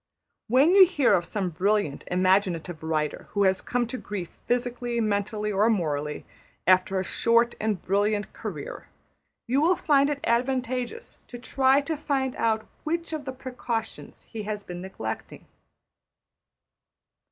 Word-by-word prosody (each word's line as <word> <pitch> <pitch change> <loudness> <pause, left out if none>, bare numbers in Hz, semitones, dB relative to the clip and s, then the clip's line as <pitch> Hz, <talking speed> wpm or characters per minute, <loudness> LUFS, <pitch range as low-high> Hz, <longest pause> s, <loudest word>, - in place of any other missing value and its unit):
When 265 +9 +5
you 390 -1 +10
hear 290 -7 +3
of 175 - +2
some 185 0 -2
brilliant 190 -3 0
imaginative 180 -2 +1
writer 155 -2 -2
who 205 -1 +2
has 190 -1 +3
come 245 -1 0
to 245 +2 -5
grief 195 -4 -5 0.2
physically, 245 -1 -1
mentally, 210 0 -1
or 210 +3 +3
morally, 150 -8 -1 0.4
after 185 +1 +4
a - - -1
short 235 +4 +2
and 215 -3 0
brilliant 205 +3 0
career, - - -7 0.6
you 265 +4 +1
will 350 +4 +4
find 285 -3 +3
it 290 -1 -2
advantageous 255 - -1
to 245 - -8
try 265 +3 +3
to 315 +3 -3
find 270 -3 -1
out 220 -1 +1 0.2
which 335 +1 -2
of 305 -3 -4
the 265 - -3
precautions 245 -3 -5
he 225 - -5
has 210 0 -4
been 175 -1 -7
neglecting. 110 -13 -6
220 Hz, 140 wpm, -26 LUFS, 190-260 Hz, 0.6 s, you